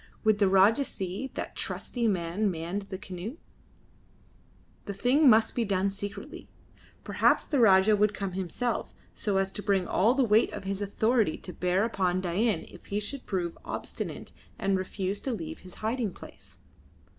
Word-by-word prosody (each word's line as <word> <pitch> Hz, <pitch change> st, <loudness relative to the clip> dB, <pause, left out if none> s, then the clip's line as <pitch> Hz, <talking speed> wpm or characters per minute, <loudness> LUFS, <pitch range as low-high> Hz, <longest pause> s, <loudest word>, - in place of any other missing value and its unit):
Would 215 Hz, -2 st, +3 dB
the 200 Hz, -2 st, +4 dB
Rajah 200 Hz, +8 st, +5 dB
see 195 Hz, +2 st, -4 dB
that -, -, -5 dB
trusty 235 Hz, -2 st, -2 dB
men 190 Hz, +1 st, 0 dB
manned 180 Hz, +4 st, -4 dB
the 190 Hz, -, -4 dB
canoe? 190 Hz, -, -7 dB, 1.5 s
The 200 Hz, -, -5 dB
thing 260 Hz, +7 st, +4 dB
must 220 Hz, -1 st, +5 dB
be 240 Hz, -, 0 dB
done 195 Hz, -2 st, +1 dB
secretly. 200 Hz, +6 st, -7 dB, 0.5 s
Perhaps -, -, +2 dB
the 285 Hz, -, 0 dB
Rajah 205 Hz, -1 st, +6 dB
would 210 Hz, 0 st, +3 dB
come 195 Hz, -2 st, -3 dB
himself, 190 Hz, +6 st, -3 dB, 0.2 s
so 200 Hz, -2 st, -1 dB
as 195 Hz, 0 st, +1 dB
to 205 Hz, -, -6 dB
bring 195 Hz, -3 st, +1 dB
all 225 Hz, +7 st, +3 dB
the 270 Hz, -, +3 dB
weight 220 Hz, -1 st, +4 dB
of -, -, -6 dB
his 195 Hz, +1 st, -3 dB
authority 220 Hz, -1 st, +1 dB
to 180 Hz, -, -8 dB
bear 180 Hz, +3 st, +1 dB
upon 185 Hz, -5 st, 0 dB
Dain 185 Hz, +1 st, 0 dB
if 180 Hz, -, -14 dB
he 205 Hz, -, -1 dB
should 250 Hz, +6 st, -6 dB
prove 175 Hz, -4 st, -2 dB
obstinate -, -, -5 dB, 0.3 s
and 195 Hz, -1 st, +1 dB
refuse 190 Hz, +1 st, -2 dB
to 265 Hz, -, -2 dB
leave 315 Hz, +7 st, -5 dB
his 185 Hz, -1 st, -14 dB
hiding 225 Hz, -3 st, -1 dB
place. -, -, -14 dB
200 Hz, 170 wpm, -28 LUFS, 190-225 Hz, 1.5 s, Rajah